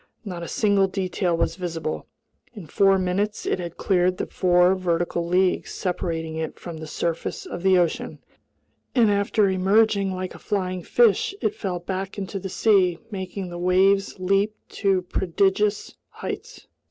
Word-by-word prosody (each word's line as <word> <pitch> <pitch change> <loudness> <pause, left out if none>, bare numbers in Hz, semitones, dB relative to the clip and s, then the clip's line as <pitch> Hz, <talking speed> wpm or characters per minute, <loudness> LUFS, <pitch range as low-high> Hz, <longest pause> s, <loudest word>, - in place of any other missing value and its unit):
Not 180 -4 -5
a 170 - -5
single 200 -2 +2
detail 185 -2 -1
was 165 0 0
visible. 165 -4 -4 0.5
In 200 -6 -8
four 195 +5 +3
minutes 190 +3 -1
it - - 0
had 170 -2 -6
cleared 185 -1 +2
the - - -2
four 180 0 +3
vertical 175 -2 -1
leagues 180 +1 +1
separating 165 -3 -3
it 160 -1 -4
from 170 -2 -8
the 160 0 -7
surface 165 +2 -3
of 175 - -6
the 190 0 +4
ocean, 175 -3 0 0.8
and 230 -4 +5
after 200 +1 +2
emerging 195 +1 +3
like 185 0 -4
a - - -12
flying 185 -3 -2
fish, 235 - +3
it 420 - 0
fell 190 - -3
back 190 +3 -5
into 195 0 -4
the 190 - -6
sea, 185 -4 +3
making 190 -1 -5
the 175 0 -7
waves 190 +2 +3
leap 195 +3 +1
to 195 -3 +1
prodigious 195 +3 0 0.2
heights. - - -7
185 Hz, 155 wpm, -24 LUFS, 175-200 Hz, 0.8 s, and